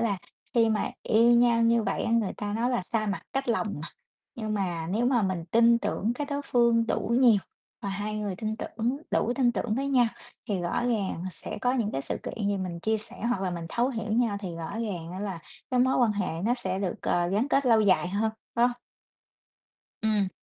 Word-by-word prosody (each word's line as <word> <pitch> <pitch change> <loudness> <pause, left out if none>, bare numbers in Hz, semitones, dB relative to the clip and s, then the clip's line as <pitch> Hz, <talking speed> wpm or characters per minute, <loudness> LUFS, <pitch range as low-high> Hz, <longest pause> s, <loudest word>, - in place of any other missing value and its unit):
là 210 -5 0 0.4
khi 230 -2 +5
mà 215 - 0
yêu 230 +2 +4
nhau 235 -1 +4
như 230 0 +4
vậy 195 -2 -1
á 230 - -1
người 230 -4 +2
ta 205 -1 -3
nói 235 +3 0
là 245 -6 0
xa 215 +3 -1
mặt 200 -1 -2
cách 270 -1 -2
lòng 230 -1 +1
mà. 165 - -6 0.5
Nhưng 215 -2 -3
mà 175 -5 -2
nếu 225 +5 +1
mà 245 -3 +3
mình 185 -4 -1
tin 235 +1 +5
tưởng 225 0 -1
cái 290 +3 -3
đối 285 0 -3
phương 235 -3 +3
đủ - - -1
nhiều 235 -5 +6 0.4
và 200 - -3
hai 205 +2 -3
người 205 -3 -3
tin 220 +1 -3
tưởng, 235 +3 -2
đủ 235 - +1
tin 250 -3 +3
tưởng 220 -2 -1
với 275 +3 -1
nhau, 255 -3 +4 0.4
thì 200 -4 0
rõ 175 +5 -1
ràng, 220 -6 +1 0.2
à, - - -2
sẽ - - -7
có 250 - +2
những 235 -5 0
cái 135 - -2
sự 135 - -3
kiện 210 - -4
gì 205 - +1
mình 180 -3 -4
chia 220 +4 +1
sẻ 215 - -7
hoặc 240 -6 0
là 185 - 0
mình 170 -1 -5
thấu 240 +7 +1
hiểu 225 -4 -3
nhau 225 -3 +2
thì 180 -4 -5
rõ 165 -1 -5
ràng 180 -8 -4
á 185 - -5
là 195 -4 -3 0.3
cái 250 -1 +3
mối 260 +1 +3
quan 235 -4 +3
hệ 205 +1 -1 0.2
nó 240 +3 +3
sẽ 190 -6 -3
được 195 -3 -1
c - - -8 0.3
gắn 215 +6 +2
kết 275 -1 +3
lâu 225 -2 +5
dài 185 -4 +3
hơn, 210 +4 0 0.2
phải 235 - +2
hông? - - -3 1.3
Ừm. 210 -3 +2
220 Hz, 235 wpm, -27 LUFS, 195-235 Hz, 1.3 s, nhiều